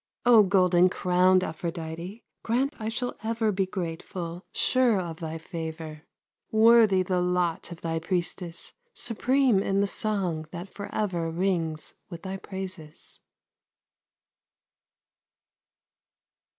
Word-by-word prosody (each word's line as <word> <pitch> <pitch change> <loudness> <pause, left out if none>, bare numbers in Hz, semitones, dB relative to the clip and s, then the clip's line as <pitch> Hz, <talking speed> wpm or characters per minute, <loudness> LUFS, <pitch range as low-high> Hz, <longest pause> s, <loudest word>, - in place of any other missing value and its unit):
O 240 -3 +8
golden 185 -2 +4
crowned 185 +1 +3
Aphrodite, 170 +4 -5 0.2
Grant 265 +6 0
I 220 0 -2
shall 245 +2 -3
ever 225 -1 0
be 190 -1 0
grateful, 175 -1 -5
Sure 255 -4 +3
of 170 -3 -5
thy 160 -1 -4
favor; 160 -2 -7 0.4
Worthy 220 -3 +6
the 180 0 0
lot 180 -1 0
of 170 - -9
thy 165 -1 -1
priestess, 175 0 -3 0.2
Supreme 250 -2 +2
in 195 0 +1
the 200 - +3
song 190 -7 -1
that 175 +3 -7
forever 190 -5 -2
Rings 165 -3 -1 0.2
with 170 -1 -9
thy 190 0 -4
praises. 190 -6 -6
185 Hz, 110 wpm, -27 LUFS, 165-205 Hz, 0.4 s, O